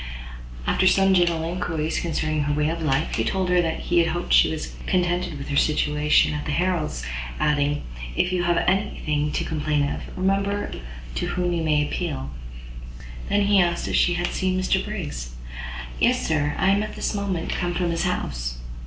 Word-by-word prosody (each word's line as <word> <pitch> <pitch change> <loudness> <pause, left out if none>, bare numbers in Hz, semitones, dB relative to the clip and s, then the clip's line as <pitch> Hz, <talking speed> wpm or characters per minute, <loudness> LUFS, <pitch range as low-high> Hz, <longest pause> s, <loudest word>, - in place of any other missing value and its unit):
After 185 - +3
some 195 +1 +5
general 170 -3 +3
inquiries 165 -2 -2
concerning 155 -3 -1
her 145 - +1
way 150 +1 +1
of 165 0 -3
life, 150 -1 0
he - - +1
told 190 -1 0
her 180 0 +4
that 165 -1 -2
he 175 -1 +3
hoped 175 +1 -1
she - - +6
was 160 -1 -4
contented 175 -3 0
with 140 - -7
her 140 - -1
situation 150 0 +3
at 150 0 -4
the - - -1
Harrels, 165 - -1 0.3
adding, 145 0 +1 0.3
"If 180 - +1
you 180 -1 +1
have 175 -1 +2
any 195 +3 +1
thing 150 0 0
to - - 0
complain 150 -2 0
of, - - -4 0.2
remember 195 +2 0 0.4
to - - -2
whom 180 -1 -1
you 170 - 0
may 150 -2 +2
appeal." 65 +1 -3 1.0
He - - +2
then 205 0 +4
asked 170 0 -1
if - - -1
she 175 - +3
had 175 0 0
seen 185 0 0
Mr 190 +1 +1
Briggs? 145 - -5 0.6
"Yes, - - +3
sir, 150 -2 +1
I 190 - +3
am 200 - +3
this 215 +1 -2
moment 200 -5 -2
come 175 -1 -1
from 175 -1 0
his 165 - 0
house." - - -2
170 Hz, 185 wpm, -24 LUFS, 150-185 Hz, 1.0 s, she